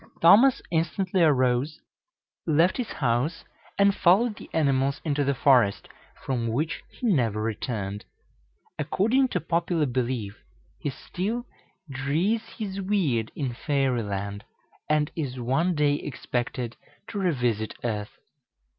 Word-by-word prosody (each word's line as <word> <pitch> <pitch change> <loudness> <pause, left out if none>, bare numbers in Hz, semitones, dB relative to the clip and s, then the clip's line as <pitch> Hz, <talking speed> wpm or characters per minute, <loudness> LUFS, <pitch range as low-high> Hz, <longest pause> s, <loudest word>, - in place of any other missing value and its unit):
Thomas 235 +10 +6
instantly 180 +3 0
arose, 135 -1 +2 0.7
left 165 +3 +3
his 250 -3 -3
house, 130 +5 0 0.3
and 200 0 +5
followed 205 +6 +3
the - - -12
animals 140 -3 +1
into 145 -2 +1
the 140 0 +1
forest, 125 -6 +3 0.4
from 120 -3 -1
which 145 +8 -1
he - - -8
never 115 - +1
returned. 105 -2 -3 0.7
According 255 +7 +2
to 185 - -1
popular 170 0 0
belief, 120 -5 -2 0.4
he - - -2
still 205 - -4 0.4
"drees 155 +11 0 0.2
his 200 -3 -4
weird" 165 - 0
in 135 -5 -2
Fairy 135 -2 0
Land, 100 0 -4 0.5
and 150 -1 +2
is 135 -6 -3
one 160 +9 +1
day 150 -1 +3
expected 120 -3 -4 0.3
to 205 - -4
revisit 125 - 0
earth. 105 -3 -3
140 Hz, 120 wpm, -26 LUFS, 120-175 Hz, 0.7 s, Thomas